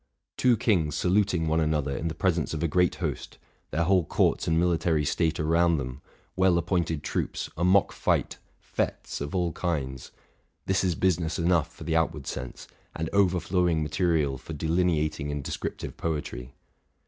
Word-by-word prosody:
Two 125 -2 +3
kings 85 -9 +1
saluting 90 -2 +1
one 80 +1 +2
another 75 -3 0
in 85 - -2
the 80 - -3
pres 90 +1 +2
ence 80 -1 -2
of 80 - -3
a - - +2
great 90 +3 +2
host, - - -4 0.3
their 80 +4 0
whole 90 0 +3
courts - - +1
and 80 0 +2
military 85 -3 +1
state 80 +2 0
around 85 +2 +3
them, 65 0 -5 0.3
well 95 -2 +4
appointed 85 -3 -1
troops, - - -3
a 85 - -2
mock 95 +2 +4
fight, - - 0 0.2
fétes - - -3
of 70 +5 -4
all 90 -2 +1
kinds, 70 -8 -3 0.6
—this 95 0 +1
is 90 -3 +1
business 85 -2 +1
enough 85 -2 +2
for - - -11
the 80 - -1
outward 80 -1 0
sense, 60 -1 -6 0.3
and 80 0 -3
overflowing 90 -4 +2
material 75 -4 0
for 80 - -8
delineating 80 -2 0
and 75 -1 -4
descriptive - - -5
poetry. 75 -5 -4
80 Hz, 165 wpm, -27 LUFS, 75-90 Hz, 0.6 s, well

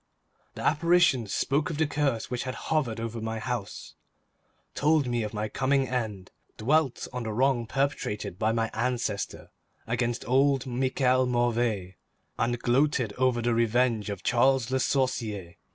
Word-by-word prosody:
The - - -6
apparition 165 -6 +3
spoke 140 +8 0
of 160 - -4
the 160 - +2
curse 145 -6 -1
which 125 -1 -2
had 130 - -4
hovered 135 -8 -1
over 115 0 -4
my 110 0 -3
house, 120 -3 -5 0.8
told 150 0 +2
me 120 -1 0
of 105 -1 -3
my 105 0 -2
coming 135 +4 +1
end, 110 -7 -3 0.3
dwelt 140 +3 +1
on 125 - -3
the 110 -1 -3
wrong 120 0 +1
perpetrated 135 -9 -2
by 110 - +2
my 115 0 -1
ancestor 115 -3 -2 0.3
against 120 +1 -2
old 135 +1 +3
Michel 130 0 +1
Mauvais, 120 -7 0 0.4
and 120 +1 +1
gloated 125 -2 +1
over 125 -2 +2
the 120 0 +2
revenge 115 -1 +1
of 100 -2 -5
Charles 130 0 +2
Le 130 - +1
Sorcier. 110 -10 -1
120 Hz, 150 wpm, -27 LUFS, 115-135 Hz, 0.8 s, apparition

